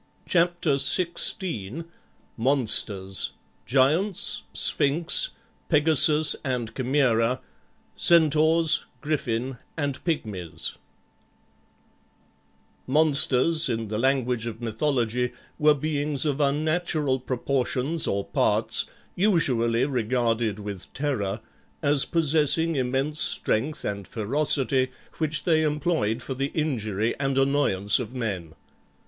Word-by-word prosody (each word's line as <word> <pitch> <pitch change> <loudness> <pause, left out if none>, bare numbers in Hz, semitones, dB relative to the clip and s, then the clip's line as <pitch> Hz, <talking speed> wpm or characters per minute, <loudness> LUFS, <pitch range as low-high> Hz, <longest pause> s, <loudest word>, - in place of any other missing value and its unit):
CHAPTER 175 -4 +1
XVI 170 - 0 0.5
MONSTERS 110 -7 +1 0.3
GIANTS, 155 - +1
SPHINX, 165 - +2 0.4
PEGASUS 155 0 +5
AND 125 -5 -3
CHIMAERA, 125 -2 +1 0.6
CENTAURS, 160 0 +4 0.2
GRIFFIN, 130 -4 -3 0.2
AND 140 -3 -3
PYGMIES 105 - -4 2.1
Monsters, 150 +1 +3
in 115 -2 -3
the 105 0 -3
language 125 -2 0
of 115 -1 -7
mythology, 120 0 -1 0.3
were 150 -1 +4
beings 145 -1 -2
of 150 -1 -1
unnatural 150 -1 0
proportions 130 +4 -2
or 100 0 -2
parts, - - 0 0.3
usually 130 - +1
regarded 120 -4 -1
with 100 -3 -8
terror, 115 -8 -3 0.4
as 145 -1 +3
possessing 160 0 +2
immense 135 +3 -1
strength 140 +8 0
and 100 -2 -4
ferocity, 130 +2 +1 0.3
which 155 -2 +1
they 160 -2 +2
employed 150 -7 -1
for 135 - -5
the 135 +1 -2
injury 115 -8 -1
and 135 -1 -1
annoyance 135 -8 +2
of 125 +1 -7
men. 95 -10 -5
135 Hz, 95 wpm, -25 LUFS, 115-155 Hz, 2.1 s, PEGASUS